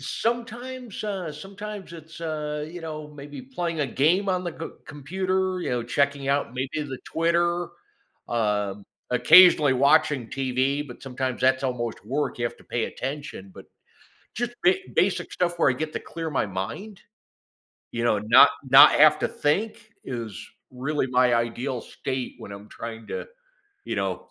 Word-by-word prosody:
Sometimes, 240 0 -4
uh, 190 -6 -3
sometimes 195 +4 -8
it's, 160 0 -11
uh, 150 -2 -3
you 175 +2 -8
know, 155 -2 -6
maybe 145 -1 -10
playing 175 - -3
a 145 - +1
game 170 - +2
on 185 -1 +1
the 175 - -3
c 165 - -4 0.2
computer, 185 +5 -2
you - - -3
know, 120 -1 0
checking 140 +3 0
out 140 -3 0
maybe 130 +4 -2
the 135 -3 -6
Twitter, 170 +1 +1 0.6
um, 105 -3 -1 0.3
occasionally 155 +2 +7
watching 135 -1 +3
TV, 135 +2 -1
but 125 - -11
sometimes 130 -1 -3
that's 130 +1 +3
almost 120 -5 -3
work, 135 +4 -2
you 120 - -1
have 120 - -3
to - - -19
pay 120 -2 -2
attention, 135 -8 -6
but, - - -12 0.7
just, 240 +1 -2
ba 370 +2 +6 0.2
basic - - +1
stuff 175 -1 -1
where - - +4
I - - 0
get 155 +3 -4
to - - -1
clear 165 -1 -6
my 135 - 0
mind. 110 - -6 0.9
You 115 0 -2
know, 115 -3 +3
not 105 +3 +7 0.2
not - - +10
have - - +6
to - - +1
think 210 +7 -1
is 115 -5 -5 0.3
really 135 +2 -2
my 125 -1 +3
ideal 120 +2 -1
state 130 +1 -5
when 100 - -9
I'm 100 +1 -10
trying 115 -1 -8
to, - - -4 0.6
you - - -3
know - - -3
145 Hz, 165 wpm, -25 LUFS, 125-175 Hz, 0.9 s, not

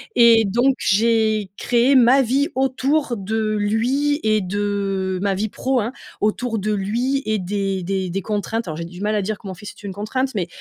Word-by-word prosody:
Et 230 -2 +6
donc 240 +7 +2
j'ai 215 -1 +2
créé 245 +3 +3
ma 255 +2 +6
vie 265 +4 +1
autour 265 0 0
de 215 +2 -1
lui 260 +8 +1
et 215 0 +3
de 195 -1 -2
ma 200 -1 +1
vie 210 +3 -2
pro, 260 +3 -1
hein, 230 +4 -3 0.3
autour 225 +1 0
de 215 +2 -1
lui 240 +8 -1
et 215 -1 0
des 195 0 -2
des 190 0 -2
des 195 +3 -2
contraintes, 215 +1 -3
alors 155 -1 -4
j'ai 165 - -4
du 180 +2 -10
mal 210 +1 0
à 210 - +1
dire 205 +2 -3
que - - -11
mon 190 - -5
fils 205 +2 -9
est - - -18
une 200 - -5
contrainte 215 +6 -3
mais 180 -4 -1
215 Hz, 205 wpm, -21 LUFS, 195-240 Hz, 0.3 s, Et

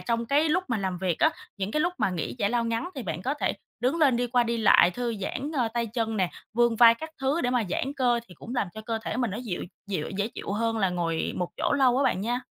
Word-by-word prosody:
trong 235 0 -1
cái 295 +5 +3
lúc 360 +4 +1
mà 245 - +1
làm 190 -2 -2
việc 180 -3 -1
á. 315 - +5 0.3
Những 195 +1 -3
cái 305 - 0
lúc 350 +2 +1
mà - - +2
nghỉ 175 +4 -3
giải 205 -2 +1
lao 240 -1 +1
ngắn 230 +9 -1
thì 265 - -5
bạn 175 -3 -4
có 275 +3 0
thể - - 0 0.3
đứng 255 +6 +1
lên 275 -6 +4
đi 245 - 0
qua 245 0 +3
đi 235 0 -1
lại, 210 -4 +6
thư 235 +4 -3
giãn, 280 +9 -3
ơ, 250 -7 +1
tay 235 -1 0
chân 225 0 -2
nè, 185 -3 +1 0.2
vươn 235 -1 +3
vai 230 0 +8
các 320 +6 -8
thứ 275 +5 +1
để 245 - 0
mà 245 -2 +2
giãn 270 +7 -1
cơ 245 -3 +2
thì 180 - -13
cũng 240 - -8
làm 205 -6 0
cho 220 - -6
cơ 225 0 -3
thể 220 - -3
mình 245 -5 0
nó 200 - -4
dịu 225 -8 -4 0.2
dịu 185 -7 -3
dễ 205 +2 0
chịu 215 - -6
hơn 225 +2 0
là 195 -3 +2
ngồi 170 -2 -1
một 180 -1 -1
chỗ - - 0
lâu 260 -3 +4
á - - +3
bạn 185 - +1
nha. 240 +4 -1
230 Hz, 285 wpm, -27 LUFS, 200-250 Hz, 0.3 s, vai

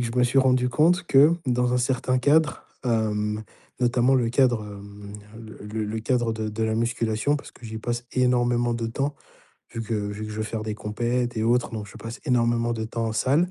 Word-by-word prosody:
que 120 - 0
je 115 +2 -3
me 125 - +5
suis 125 +3 +2
rendu 130 -1 +3
compte 170 +7 +3
que, 145 +4 +6
dans 125 0 +1
un - - +2
certain 130 0 0
cadre, 150 +3 +2 0.2
hem, 105 -2 0 0.4
notamment 125 +1 +3
le 120 -3 +1
cadre, 120 -3 +2
hem, 100 0 -10 0.3
le 110 -1 -11
le 110 +1 -3
le 110 +1 -3
cadre 120 0 0
de 110 -1 -3
de 105 +1 -3
la 110 0 0
musculation, 115 +4 0
parce - - -10
que - - -17
j'y 110 0 -6
passe 120 +2 -3
énormément 120 -1 +2
de 115 -1 -2
temps, 140 +5 -2 0.6
vu 115 - -3
que 115 +1 -3
vu 105 0 -3
que - - -7
je 105 - -6
veux 110 - -1
faire 110 0 -4
des 110 -1 -3
compètes 120 +3 -2
et 110 - 0
autres, 120 +2 +2
donc 105 -2 -5
je - - -13
passe 115 +2 -8
énormément 120 -3 +2
de 110 -1 -3
temps 115 +1 -3
en 110 - -2
salle. 140 +10 +2
120 Hz, 220 wpm, -25 LUFS, 110-125 Hz, 0.6 s, que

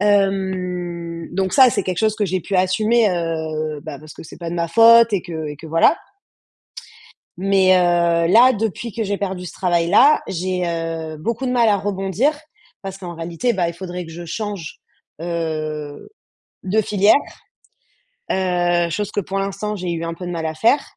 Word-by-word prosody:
hem, 180 -4 -1
donc 190 +1 -1
ça, 260 -3 +7
c'est - - -1
quelque 180 -2 -3
chose 215 -1 +1
que 210 - 0
j'ai 185 0 -1
pu 195 +1 -2
assumer, 215 +4 +2
heu, 160 -3 -3
ben, 155 -4 -7
parce 155 0 -12
que - - -11
c'est 160 - -12
pas 170 -1 -5
de - - -4
ma 170 -1 -1
faute 230 +2 +6
et 190 - 0
que 160 -3 -6
et 145 - -7
que, 165 - -11
voilà. 165 - +3 1.4
Mais 195 -1 +3
heu, - - +4 0.5
là, 250 +3 +7
depuis 225 +1 -3
que 225 - -3
j'ai 200 0 -1
perdu 190 -2 -4
ce 165 - -8
travail-là, 180 - +3
j'ai, 180 0 -2
heu, 165 -1 -4
beaucoup 235 +9 -3
de 250 - -1
mal 235 -2 +3
à 205 - +4
rebondir 200 - -1 0.5
parce 195 -1 -7
qu'en 175 -3 -7
réalité, 170 +9 -2
bah, 180 -4 0
il 170 - -6
faudrait 180 0 -6
que 165 - -11
je 170 +1 -8
change, 205 -3 -5 0.4
heu, 155 -3 -4 0.5
de 205 +4 +1
filière, 205 0 +4 1.2
heu, 175 -2 +1
chose 205 +5 -2
que 205 - 0
pour 195 +1 -4
l'instant, 195 +2 -3
j'ai 180 -2 -4
eu 165 0 -3
un 165 0 -4
peu 180 - -9
de 175 - -4
mal 165 -2 -3
à 160 - -3
faire. 230 - +3
185 Hz, 185 wpm, -20 LUFS, 165-205 Hz, 1.4 s, ça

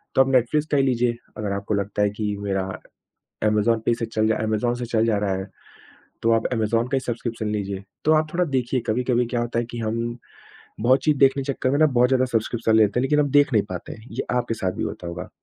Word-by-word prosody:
तो 135 - +6
आप 135 - +3
नेटफ्लिक्स 135 +5 +2
का 145 - +3
ही 135 - +4
लीजिए। 120 -2 +1 0.2
अगर 105 -2 -3
आपको 100 +2 -2
लगता 100 +1 -1
है 105 - +3
कि 105 -2 -1
मेरा 100 -1 -1 0.8
अमेज़न 105 +2 +2
पे 120 - +3
से 115 - -2
चल 110 -1 0
अमेज़न 110 +2 0
से - - -2
चल 115 -1 +1
जा 110 -3 +2
रहा 100 -2 0
है, 95 +1 -5 0.7
तो 115 - +3
आप 115 0 +2
अमेज़न 115 0 +1
का 135 - 0
ही - - +1
सब्स्क्रिप्शन 115 -3 -4
लीजिए। 100 -2 -3 0.2
तो 155 - +4
आप 155 0 +1
थोड़ा 180 +1 +2
देखिए, 130 -3 -1
कभी-कभी 125 +1 +1
क्या 120 - +1
होता 120 0 -2
है 120 - +1
कि 120 - -6
हम 115 +1 -2 0.6
बहुत 130 +4 +3
चीज़ 150 -2 +3
देखने 135 0 +4
के 140 - -2
चक्कर 130 0 -1
में 140 - +1
ना, 155 - +6
बहुत 125 -3 +3
ज़्यादा 130 -1 +3
सब्स्क्रिप्शन 115 -1 0
ले 110 - +6
लेते 105 +4 +2
हैं, - - -1
लेकिन 150 +3 +2
हम 145 -2 +1
देख 145 0 +4
नहीं 105 -3 +4
पाते 90 -2 -6
हैं। 110 +2 -11
ये 120 - -3
आपके 120 -2 0
साथ 95 -4 -2
भी - - -2
होता 90 - -6
होगा। 85 +1 -6
115 Hz, 250 wpm, -23 LUFS, 105-130 Hz, 0.8 s, तो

